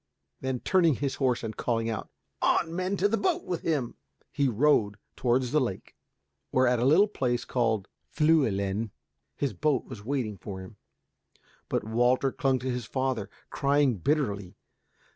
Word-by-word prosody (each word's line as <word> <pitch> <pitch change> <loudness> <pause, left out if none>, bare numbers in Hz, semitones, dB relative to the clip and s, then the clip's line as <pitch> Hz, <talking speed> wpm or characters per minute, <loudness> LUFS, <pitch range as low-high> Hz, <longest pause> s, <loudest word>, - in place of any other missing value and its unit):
Then 130 -2 -3
turning 170 -6 +3
his 140 +2 -2
horse 125 -3 +1
and 110 -1 -4
calling 115 -2 -1
out, 110 -1 -4 0.3
"On, 165 0 +2
men, 185 +2 -1
to 195 - +3
the 225 +2 +1
boat 365 -2 +1
with 175 -2 -3
him," 145 -8 -1 0.4
he 140 - +1
rode 115 -4 +2 0.2
towards 125 0 +1
the 150 - +3
lake, 110 -7 -4 0.5
where, 130 0 +3
at 125 -1 +3
a 120 - +1
little 170 +10 +6
place 125 - -1
called 110 -5 0 0.2
Fliielen, 110 -10 +2 0.5
his 140 -5 -1
boat 135 - 0
was 115 -6 -9
waiting 115 -6 -2
for 95 -1 -7
him. 95 +3 -11 0.9
But - - 0
Walter 120 +4 +2
clung 135 0 +1
to 130 0 -2
his 125 -2 -3
father, 130 -5 -2 0.2
crying 140 -4 +2
bitterly. 100 - -1
130 Hz, 160 wpm, -28 LUFS, 110-145 Hz, 0.9 s, little